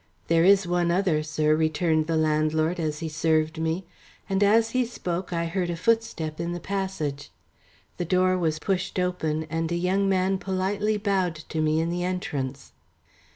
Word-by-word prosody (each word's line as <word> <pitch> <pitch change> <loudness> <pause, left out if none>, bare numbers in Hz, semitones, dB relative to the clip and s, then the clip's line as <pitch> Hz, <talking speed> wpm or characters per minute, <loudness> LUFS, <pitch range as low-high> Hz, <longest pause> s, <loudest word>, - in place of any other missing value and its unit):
"There 165 0 +4
is 195 +1 +5
one 175 0 +1
other, 175 -3 +2
sir," 155 0 +1
returned 155 0 +1
the 165 -1 +1
landlord 155 +2 +1
as 155 -2 -2
he 165 - -2
served 155 0 0
me, 160 +3 -1 0.4
and 195 0 0
as 225 +3 +4
he 255 0 +2
spoke 185 -7 -4
I 170 -1 -1
heard 175 +1 -2
a 170 - -1
footstep 170 -6 0
in 170 +1 -2
the 175 - -4
passage. 185 -8 -3 0.7
The 175 - -2
door 185 +1 +3
was 160 -4 0
pushed 185 +4 -2
open, 160 -4 -1
and 165 +1 -2
a - - +1
young 190 +3 +1
man 190 0 +1
politely 195 +3 -1
bowed 195 -5 0
to 160 - -1
me 155 0 +2
in 165 +1 0
the 175 0 -2
entrance. 140 -7 -3
170 Hz, 175 wpm, -26 LUFS, 155-190 Hz, 0.7 s, is